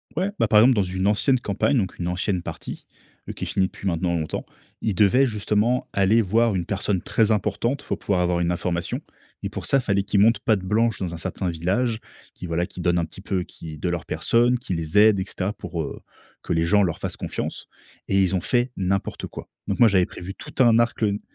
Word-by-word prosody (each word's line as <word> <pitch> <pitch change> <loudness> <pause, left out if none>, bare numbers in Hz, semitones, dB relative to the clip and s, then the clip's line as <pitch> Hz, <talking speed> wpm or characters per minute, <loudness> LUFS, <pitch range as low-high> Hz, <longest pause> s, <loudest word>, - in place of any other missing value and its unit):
Ouais, 185 +5 0
bah, - - +3
par 105 0 +6
exemple, 125 +4 +6
dans 105 - +3
une 95 +1 -2
ancienne 125 +5 +3
campagne 125 +5 0
donc 95 -6 -2
une 85 - -2
ancienne 90 +1 -1
partie, - - -7 0.4
heu, - - -4
qui - - -7
est - - -2
finie 95 -1 +1
depuis 100 - -7
maintenant 85 0 0
longtemps, 80 -1 -3 0.4
ils 105 -4 -1
devaient, 105 +8 +4
justement, 105 +2 0
aller 100 +4 +4
voir 110 +1 +2
une 90 - -1
personne 95 -1 -1
très 110 -1 +1
importante 110 +6 0
pour - - -3
pouvoir 95 -3 0
avoir 90 0 +1
une 85 0 +1
information 85 0 -2 0.4
et - - -2
pour - - -6
ça, 135 - +3
fallait 100 -6 +1
qu'ils 100 0 +1
montrent 105 0 +4
patte 110 -6 +2
blanche 110 +4 +1
dans 90 -3 -4
un - - -5
certain 90 +3 -3
village, 100 +8 0 0.3
qu'ils, 90 - -8
voilà, 85 +1 0
qu'ils 90 - -9
donnent 85 0 +2
un 85 - +1
petit 80 +4 -10
peu, 95 -2 -1
qui 80 -3 -10
de 80 - -3
leur 85 -1 -3
personne, 120 +2 +2
qu'ils 95 -7 -4
les 80 +4 -2
aident 105 -1 +6
et 95 - -2
cetera 100 0 -3
pour, 85 -5 -5
heu, - - -6 0.4
que - - -2
les 80 - +2
gens 105 +4 +4
leur 85 -4 -1
fassent - - -4
confiance - - -5 0.4
et 95 0 +3
ils 95 0 +1
ont 90 - 0
fait 120 +6 +1
n'importe 95 +1 -2
quoi. - - -9 0.2
Donc - - -2
moi, 120 - +8
j'avais 95 -3 +3
prévu 95 +2 -8
tout 130 - -1
un 115 -1 +5
arc, 120 -1 0
heu 100 -1 +1
100 Hz, 235 wpm, -24 LUFS, 90-110 Hz, 0.4 s, moi